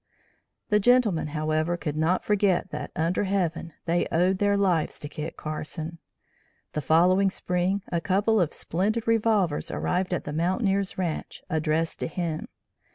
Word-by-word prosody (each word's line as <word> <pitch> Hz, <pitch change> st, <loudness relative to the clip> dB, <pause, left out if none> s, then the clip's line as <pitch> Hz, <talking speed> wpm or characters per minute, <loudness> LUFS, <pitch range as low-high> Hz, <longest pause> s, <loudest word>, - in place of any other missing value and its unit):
The 210 Hz, -, +4 dB
gentlemen, 220 Hz, -8 st, +3 dB
however, 155 Hz, +2 st, 0 dB
could 150 Hz, -4 st, -3 dB
not 160 Hz, +4 st, +1 dB
forget 195 Hz, -3 st, +2 dB
that -, -, -5 dB
under 170 Hz, +5 st, 0 dB
heaven, 175 Hz, -4 st, -1 dB
they 170 Hz, +1 st, +1 dB
owed 180 Hz, +3 st, +2 dB
their 205 Hz, 0 st, +3 dB
lives 180 Hz, -6 st, +1 dB
to 145 Hz, -, -5 dB
Kit 155 Hz, +2 st, -6 dB
Carson. 155 Hz, +2 st, -5 dB, 0.7 s
The 150 Hz, -, -1 dB
following 180 Hz, +6 st, +4 dB
spring 185 Hz, +1 st, -1 dB
a 170 Hz, -1 st, 0 dB
couple 200 Hz, +3 st, +2 dB
of 165 Hz, -, +1 dB
splendid 210 Hz, +7 st, -1 dB
revolvers 215 Hz, -8 st, +2 dB
arrived 185 Hz, +1 st, -1 dB
at 180 Hz, -, -1 dB
the 145 Hz, -, -5 dB
mountaineer's 190 Hz, +4 st, 0 dB
ranche 175 Hz, -4 st, -3 dB
addressed 160 Hz, +1 st, 0 dB
to -, -, -2 dB
him. 165 Hz, -2 st, -3 dB
180 Hz, 150 wpm, -26 LUFS, 160-195 Hz, 0.7 s, The